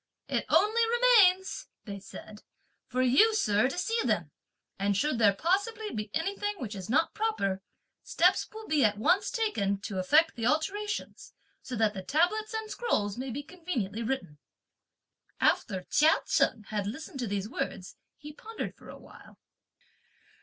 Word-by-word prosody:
"It -, -, -1 dB
only 440 Hz, +3 st, +3 dB
remains," 430 Hz, -6 st, +4 dB, 0.2 s
(they 200 Hz, -3 st, -6 dB
said), 210 Hz, +2 st, -11 dB, 0.5 s
"for 255 Hz, 0 st, 0 dB
you, 420 Hz, -, +5 dB
sir, 210 Hz, -, +2 dB
to 270 Hz, -, -5 dB
see 455 Hz, +5 st, 0 dB
them; -, -, -1 dB, 0.5 s
and 200 Hz, 0 st, +1 dB
should 290 Hz, 0 st, 0 dB
there 205 Hz, -3 st, +5 dB
possibly 415 Hz, -, -1 dB
be 210 Hz, -1 st, -4 dB
anything 400 Hz, -, -2 dB
which 230 Hz, -, -5 dB
is 190 Hz, -1 st, -7 dB
not 290 Hz, +7 st, +2 dB
proper, 420 Hz, -, -1 dB, 0.4 s
steps -, -, +2 dB
will 440 Hz, 0 st, -10 dB
be 300 Hz, -3 st, +2 dB
at 210 Hz, -2 st, +2 dB
once 355 Hz, -, +2 dB
taken 205 Hz, -, -1 dB
to 200 Hz, -2 st, -4 dB
effect 310 Hz, -, +3 dB
the 230 Hz, -1 st, -1 dB
alterations, 405 Hz, +9 st, -2 dB, 0.3 s
so 255 Hz, -, -6 dB
that 220 Hz, -2 st, +2 dB
the 190 Hz, -, -5 dB
tablets 355 Hz, -, +1 dB
and 440 Hz, -1 st, -4 dB
scrolls 205 Hz, -, -1 dB
may 260 Hz, +1 st, -5 dB
conveniently 280 Hz, -, -4 dB
be 225 Hz, -, -3 dB
written." 190 Hz, -, -4 dB, 1.0 s
After 190 Hz, -5 st, +1 dB
Chia 310 Hz, -, +3 dB
Cheng 225 Hz, -4 st, +1 dB
had 205 Hz, -2 st, -2 dB
listened 270 Hz, +4 st, -7 dB
to 245 Hz, -, -2 dB
these 200 Hz, 0 st, -2 dB
words, 245 Hz, -, -5 dB, 0.2 s
he 300 Hz, 0 st, -10 dB
pondered 450 Hz, +6 st, -6 dB
for -, -, -15 dB
a -, -, -9 dB
while. -, -, -16 dB
280 Hz, 160 wpm, -29 LUFS, -, 1.0 s, you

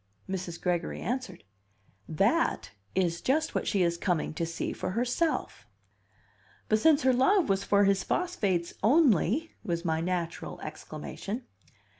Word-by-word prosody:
Mrs. 185 Hz, -3 st, -4 dB
Gregory 175 Hz, -2 st, -1 dB
answered. 245 Hz, -8 st, -4 dB, 0.7 s
"That 200 Hz, -, +1 dB, 0.2 s
is 175 Hz, -2 st, +1 dB
just 310 Hz, +4 st, +1 dB
what -, -, -1 dB
she 195 Hz, -3 st, +2 dB
is 170 Hz, 0 st, 0 dB
coming 175 Hz, -5 st, 0 dB
to 165 Hz, +1 st, -2 dB
see 170 Hz, -, -3 dB
for -, -, -4 dB
herself." 250 Hz, -, -1 dB, 1.0 s
"But 215 Hz, -, +3 dB
since 305 Hz, +4 st, +4 dB
her 260 Hz, 0 st, +4 dB
love 310 Hz, -, +3 dB
was 195 Hz, 0 st, +1 dB
for 200 Hz, 0 st, +3 dB
his 195 Hz, -1 st, +3 dB
phosphates 200 Hz, -, -1 dB
only 270 Hz, -, +3 dB
!" -, -, -38 dB
was 170 Hz, 0 st, -2 dB
my 160 Hz, -1 st, 0 dB
natural 170 Hz, -1 st, -3 dB
exclamation. 225 Hz, +6 st, -6 dB
195 Hz, 140 wpm, -29 LUFS, 175-260 Hz, 1.0 s, since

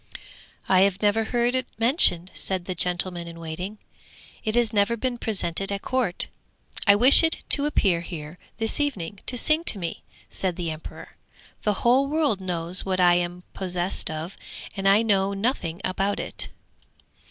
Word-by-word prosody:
'I 190 Hz, -1 st, +3 dB
have 195 Hz, 0 st, +1 dB
never 215 Hz, +2 st, +1 dB
heard 240 Hz, +1 st, 0 dB
it 255 Hz, -1 st, -2 dB
mentioned,' 225 Hz, -, +4 dB
said 185 Hz, -2 st, -1 dB
the 185 Hz, -, -4 dB
gentleman 175 Hz, 0 st, -1 dB
in 165 Hz, 0 st, -10 dB
waiting. 180 Hz, +6 st, -7 dB, 0.7 s
'It 215 Hz, +1 st, -2 dB
has 235 Hz, -2 st, +1 dB
never 210 Hz, +3 st, +1 dB
been 245 Hz, 0 st, -3 dB
presented 195 Hz, -3 st, -3 dB
at 200 Hz, 0 st, -4 dB
court.' 255 Hz, -9 st, -2 dB, 0.6 s
'I 200 Hz, -, +7 dB
wish 250 Hz, +6 st, +10 dB
it 325 Hz, -1 st, 0 dB
to 290 Hz, 0 st, +3 dB
appear 190 Hz, -, +1 dB
here 160 Hz, -1 st, -9 dB, 0.2 s
this 225 Hz, +3 st, -1 dB
evening 205 Hz, -, -3 dB
to 250 Hz, -, +1 dB
sing 310 Hz, +6 st, +3 dB
to 215 Hz, -, +2 dB
me,' 170 Hz, -3 st, -6 dB, 0.3 s
said 185 Hz, -3 st, -3 dB
the 170 Hz, -2 st, -4 dB
emperor. 155 Hz, 0 st, -10 dB, 0.5 s
'The 210 Hz, -, 0 dB
whole 260 Hz, +3 st, +3 dB
world 290 Hz, -9 st, 0 dB
knows 175 Hz, 0 st, -1 dB
what 190 Hz, -1 st, -2 dB
I 175 Hz, -1 st, +5 dB
am 175 Hz, 0 st, -2 dB
possessed 180 Hz, -1 st, -1 dB
of, 160 Hz, +4 st, -6 dB, 0.4 s
and 195 Hz, -1 st, 0 dB
I 205 Hz, +3 st, +4 dB
know 200 Hz, -2 st, +1 dB
nothing 195 Hz, -6 st, -2 dB
about 195 Hz, +2 st, -2 dB
it!' -, -, -1 dB
195 Hz, 165 wpm, -24 LUFS, 175-235 Hz, 0.7 s, wish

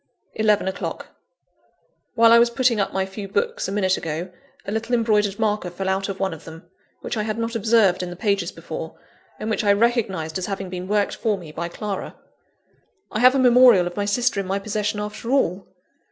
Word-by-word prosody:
(11 215 Hz, -2 st, +2 dB
o'clock.) 190 Hz, -, -4 dB, 1.1 s
While 230 Hz, 0 st, +6 dB
I 235 Hz, -, +8 dB
was 235 Hz, 0 st, +4 dB
putting 235 Hz, -1 st, +1 dB
up 200 Hz, -, 0 dB
my 190 Hz, 0 st, -1 dB
few 195 Hz, +1 st, -7 dB
books, 470 Hz, -, -1 dB
a -, -, -4 dB
minute 190 Hz, -2 st, +1 dB
ago, 165 Hz, +3 st, -4 dB, 0.3 s
a -, -, -4 dB
little 225 Hz, +3 st, -1 dB
embroidered 210 Hz, -4 st, +1 dB
marker 210 Hz, -4 st, 0 dB
fell 190 Hz, +2 st, -5 dB
out 195 Hz, +1 st, -1 dB
of 195 Hz, -, -5 dB
one 190 Hz, -3 st, -1 dB
of 160 Hz, 0 st, -11 dB
them, 165 Hz, +1 st, -12 dB, 0.3 s
which -, -, -4 dB
I -, -, 0 dB
had 215 Hz, +1 st, -3 dB
not 230 Hz, 0 st, -2 dB
observed 220 Hz, -4 st, +3 dB
in 180 Hz, -, -4 dB
the 175 Hz, -, -7 dB
pages 200 Hz, +1 st, 0 dB
before; -, -, -7 dB, 0.4 s
and 215 Hz, -, -5 dB
which 220 Hz, 0 st, -1 dB
I 200 Hz, -1 st, +5 dB
recognised 200 Hz, -7 st, 0 dB
as 180 Hz, -, -4 dB
having 195 Hz, -2 st, -4 dB
been 180 Hz, 0 st, -5 dB
worked 205 Hz, 0 st, +1 dB
for 215 Hz, -3 st, 0 dB
me 170 Hz, -5 st, -10 dB
by 170 Hz, +2 st, -4 dB
Clara. 200 Hz, +2 st, -5 dB, 1.0 s
I 215 Hz, -, -2 dB
have 255 Hz, +3 st, +6 dB
a -, -, +3 dB
memorial 245 Hz, -6 st, +6 dB
of 175 Hz, 0 st, -5 dB
my 205 Hz, -, -1 dB
sister 220 Hz, +1 st, +1 dB
in 195 Hz, -, -3 dB
my 195 Hz, +1 st, 0 dB
possession, 210 Hz, +1 st, -2 dB
after 210 Hz, +2 st, -6 dB
all! 200 Hz, -9 st, +1 dB
205 Hz, 210 wpm, -22 LUFS, 190-230 Hz, 1.1 s, I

